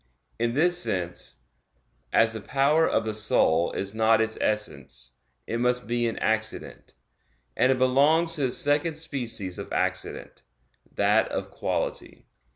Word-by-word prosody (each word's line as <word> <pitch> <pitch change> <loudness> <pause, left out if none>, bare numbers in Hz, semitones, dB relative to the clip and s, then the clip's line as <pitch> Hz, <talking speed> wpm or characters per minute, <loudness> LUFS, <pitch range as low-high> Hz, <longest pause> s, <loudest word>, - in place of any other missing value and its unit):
In 120 +1 0
this 175 +4 +2
sense, 90 -6 -2 0.7
as 115 0 +4
the 110 - -5
power 140 +7 +2
of - - +1
the 110 -1 -3
soul 85 -5 +2
is 100 +1 -4
not 110 0 +3
its 110 0 0
essence, 70 -12 -2 0.3
it 115 - -3
must 125 0 +2
be 120 0 0
an 115 - -4
accident; 110 0 -2 0.6
and 130 - +3
it 130 - +1
belongs 145 +6 +3
to 155 - -1
the 130 -2 +1
second 145 +4 +1
species 120 - -2
of - - -8
accident, - - -3 0.5
that - - +2
of - - -4
quality. - - -4
115 Hz, 145 wpm, -26 LUFS, 110-140 Hz, 0.7 s, as